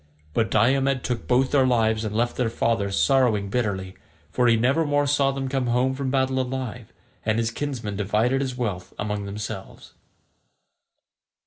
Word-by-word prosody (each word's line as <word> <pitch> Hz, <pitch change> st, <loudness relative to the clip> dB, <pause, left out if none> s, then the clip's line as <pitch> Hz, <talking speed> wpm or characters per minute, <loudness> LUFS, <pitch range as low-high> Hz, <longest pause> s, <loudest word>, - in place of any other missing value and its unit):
But 110 Hz, -1 st, +1 dB
Diomed 130 Hz, +4 st, +2 dB
took 125 Hz, -2 st, -3 dB
both 130 Hz, +1 st, +2 dB
their 135 Hz, -3 st, +4 dB
lives 110 Hz, -3 st, +2 dB
and 105 Hz, -1 st, -3 dB
left 120 Hz, +2 st, 0 dB
their 125 Hz, -3 st, 0 dB
father 115 Hz, -3 st, 0 dB
sorrowing 105 Hz, +1 st, +2 dB
bitterly, 100 Hz, -6 st, -2 dB, 0.4 s
for 125 Hz, -1 st, +2 dB
he 115 Hz, -, +5 dB
nevermore 145 Hz, +4 st, +2 dB
saw 140 Hz, -1 st, +2 dB
them 135 Hz, -1 st, -3 dB
come 130 Hz, -2 st, -1 dB
home 125 Hz, +2 st, +2 dB
from 135 Hz, 0 st, -3 dB
battle 130 Hz, 0 st, +1 dB
alive, 125 Hz, -3 st, -5 dB, 0.3 s
and 110 Hz, 0 st, +1 dB
his 115 Hz, 0 st, 0 dB
kinsmen 115 Hz, -7 st, -4 dB
divided 110 Hz, +6 st, +1 dB
his 130 Hz, -2 st, -3 dB
wealth 100 Hz, -7 st, -4 dB
among 105 Hz, -1 st, -3 dB
themselves. 100 Hz, -1 st, -7 dB
120 Hz, 155 wpm, -24 LUFS, 110-130 Hz, 0.4 s, he